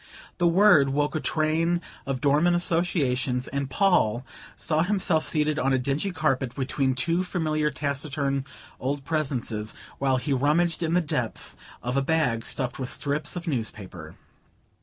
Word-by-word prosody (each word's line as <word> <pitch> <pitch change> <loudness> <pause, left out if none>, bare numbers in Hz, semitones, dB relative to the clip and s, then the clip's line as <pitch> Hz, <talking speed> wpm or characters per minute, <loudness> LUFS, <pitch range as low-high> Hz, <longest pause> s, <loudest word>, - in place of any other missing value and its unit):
The 175 - +4
word 170 -6 +6
woke 145 +2 0
a 155 - 0
train 160 +3 +1 0.3
of 135 -2 -2
dormant 150 +5 +3
associations, 140 -8 0
and 140 0 -3
Paul 130 - +2 0.3
saw 155 -1 0
himself 180 -3 +1
seated 155 -1 +1
on 135 -1 +2
a - - +4
dingy 140 +9 -1
carpet, 135 -8 -1
between 135 -1 0
two 170 +6 +1
familiar 155 -4 0
taciturn 140 -1 -2 0.4
old 135 +1 -3
presences, 125 -9 -2 0.2
while 135 -1 +2
he 140 +3 -1
rummaged 155 +6 +2
in 165 0 +1
the 180 - +4
depths 125 -8 -1 0.3
of 125 +1 -2
a - - +3
bag 135 -6 0
stuffed 130 -2 -2
with 130 -1 -3
strips 145 +2 -1
of 175 -1 -6
newspaper. 100 - -4
145 Hz, 150 wpm, -26 LUFS, 130-165 Hz, 0.4 s, word